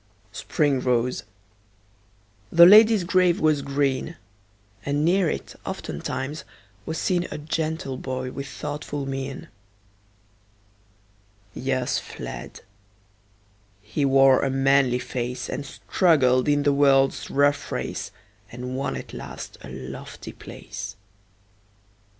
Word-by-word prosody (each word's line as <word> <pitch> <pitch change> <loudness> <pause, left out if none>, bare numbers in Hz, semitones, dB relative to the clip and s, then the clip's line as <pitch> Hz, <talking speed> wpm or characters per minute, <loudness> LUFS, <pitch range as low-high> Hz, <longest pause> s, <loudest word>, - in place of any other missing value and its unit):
Spring 140 +4 0
rose; 125 0 0 1.3
the 170 0 +9
lady's 215 +1 +8
grave 180 -1 +3
was 155 -2 +2
green; 140 +3 -1 0.7
And 145 +1 0
near 180 0 +3
it, - - -5
oftentimes, 140 +4 -5 0.4
was 160 - -3
seen 180 0 0
A - - -5
gentle 155 -2 -3
boy 130 -1 -4
with 140 +1 -6
thoughtful 145 0 -5
mien. 135 0 -5 2.1
Years 130 -1 -1
fled; - - -8 1.2
he 110 +7 -2
wore 135 -1 +5
a 135 - +1
manly 135 -1 +3
face, 125 0 -4
And 140 - -4
struggled 130 -7 +2
in 145 0 +2
the 145 0 +3
world's 135 -1 +3
rough 145 0 +1
race, - - -3 0.4
And 125 +1 -6
won 135 +2 -2
at - - -8
last - - -8
a - - -10
lofty - - -8
place. - - -8
140 Hz, 110 wpm, -24 LUFS, 130-155 Hz, 2.1 s, the